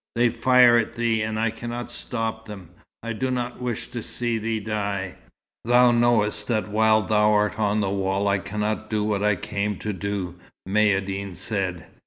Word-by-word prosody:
They 120 +1 +3
fire 120 0 +5
at 115 - -3
thee 115 -2 +1
and 110 0 -2
I 115 0 +1
cannot 120 +1 -6
stop 110 -2 -4
them. 95 -5 -10 0.3
I 115 0 -3
do 130 +4 -2
not 125 -1 -3
wish 120 -3 -4
to 120 -1 -4
see 120 0 -2
thee 110 0 -2
die." 100 -3 -3 0.5
"Thou 120 +1 +5
knowest 115 -3 +2
that 110 -3 -1
while 110 +1 +3
thou 105 -1 +3
art 105 0 +1
on 105 0 +1
the 100 - 0
wall 100 0 0
I 100 0 +2
cannot 105 +2 -3
do 105 -1 0
what 105 -2 0
I 105 -1 +3
came 100 +1 -3
to 105 +3 -4
do," 95 -2 -4 0.3
Maïeddine 100 -2 0
said. 95 -1 -3
110 Hz, 180 wpm, -24 LUFS, 100-115 Hz, 0.5 s, fire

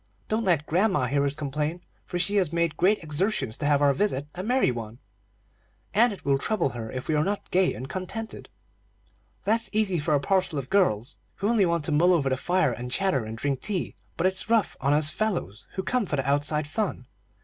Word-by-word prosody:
Don't 220 +1 0
let 165 -6 +2
grandma 180 -4 +2
hear 140 +3 +1
us 140 0 -1
complain, 150 +4 -3 0.3
for 175 - -3
she 200 +4 0
has 180 -6 +2
made 170 -1 0
great 195 +1 +2
exertions 155 - -1
to 145 - -1
have 145 -1 +3
our 140 -1 +5
visit 145 -4 0
a 180 - -5
merry 245 - +2
one, 115 -1 -6 1.0
and 235 +3 +5
it 200 - -9
will 140 -1 +2
trouble 185 -3 +1
her 115 -2 -6
if 130 0 -5
we 160 - +1
are 150 0 +3
not 200 +3 -3
gay 185 0 +3
and 125 +5 -6
contented." 190 +8 -6 0.9
"That's 225 +2 +1
easy 210 -5 +1
for 150 0 +1
a - - +3
parcel 185 +1 +1
of 135 -2 -5
girls, 140 - +1 0.2
who 200 - -1
only 215 -6 +3
want 170 -3 0
to 155 - -1
mull 175 +5 +4
over 145 -6 +2
the 130 - 0
fire, 180 +6 +1
and 125 +1 -6
chatter, 140 - +1
and 110 +1 -6
drink 140 +1 -1
tea; 195 -4 -2 0.2
but 175 - 0
it's 190 +3 0
rough 230 -3 +2
on 140 +1 +2
us 150 +1 +4
fellows, 175 - -2
who 190 - -3
come 225 +3 0
for 150 - -1
the 135 -1 -2
outside 145 +2 +1
fun. 175 - -3
165 Hz, 215 wpm, -26 LUFS, 140-195 Hz, 1.0 s, our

